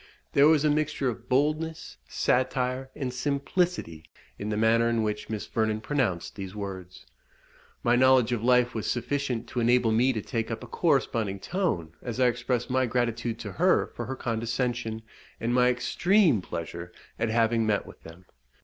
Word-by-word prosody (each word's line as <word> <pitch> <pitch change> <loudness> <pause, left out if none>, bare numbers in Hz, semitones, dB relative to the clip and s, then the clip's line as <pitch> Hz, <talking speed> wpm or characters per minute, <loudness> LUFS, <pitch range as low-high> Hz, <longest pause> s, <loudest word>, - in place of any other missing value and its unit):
There 140 +1 +6
was 155 -1 +4
a - - +4
mixture 150 -3 0
of 120 +1 -8
boldness, 155 +4 -1
satire, 130 +1 0
and 130 -3 -3
simplicity 140 - -1 0.3
in 105 - -4
the 105 - -1
manner 115 +1 +3
in 115 -1 +1
which 105 0 -3
Miss 110 -2 -4
Vernon 110 -1 -1
pronounced 110 - -1
these 95 -1 -7
words. 95 -3 -7 0.8
My 120 0 +4
knowledge 130 -1 +4
of 115 -2 -1
life 125 0 +3
was 110 - -3
sufficient 125 -1 -2
to 125 - -3
enable 120 0 +3
me 120 +4 +3
to 115 - -2
take 115 -1 -3
up 115 -1 -5
a - - -8
corresponding 115 - 0
tone 95 - -2
as 120 0 -5
I 130 - +4
expressed 125 0 0
my 130 0 +2
gratitude 120 -1 -1
to - - -6
her - - +2
for - - -5
her 130 - -3
condescension, 115 -1 -2 0.4
and 120 +1 -1
my 125 0 +4
extreme 165 - +2
pleasure 85 0 -6 0.3
at 115 - 0
having 115 0 +2
met 105 -2 +1
with - - -14
them. 80 +3 -13
120 Hz, 170 wpm, -27 LUFS, 110-130 Hz, 0.8 s, There